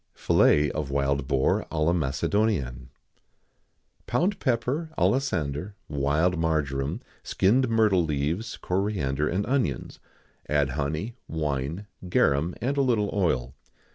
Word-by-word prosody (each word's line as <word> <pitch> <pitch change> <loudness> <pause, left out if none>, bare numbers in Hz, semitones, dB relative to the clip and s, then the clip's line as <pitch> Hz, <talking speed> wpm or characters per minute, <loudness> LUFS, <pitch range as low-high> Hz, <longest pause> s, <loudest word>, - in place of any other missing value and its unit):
[XIX - - -21
] - - -16
Fillet 75 0 +4
of 75 -3 -3
Wild 70 -1 0
Boar 70 -2 +1
à 75 -1 0
la 85 - +3
Macédonienne. 70 - 0 1.2
Pound 180 +11 +1
pepper, 130 +5 0
alisander, 90 - 0
wild 75 +5 +1
marjoram, 75 -4 -1 0.2
skinned 120 +7 +2
myrtle 110 -5 +3
leaves, 80 +9 -2
coriander, 90 -7 -1
and 95 +4 -1
onions; 120 - -1 0.5
add 75 -2 +2
honey, 80 - -3
wine, 75 +3 -2 0.2
garum, 80 +1 +2
and 135 +4 -1
a - - +4
little 115 -6 +1
oil. 65 -11 0
80 Hz, 120 wpm, -26 LUFS, 70-105 Hz, 1.2 s, Fillet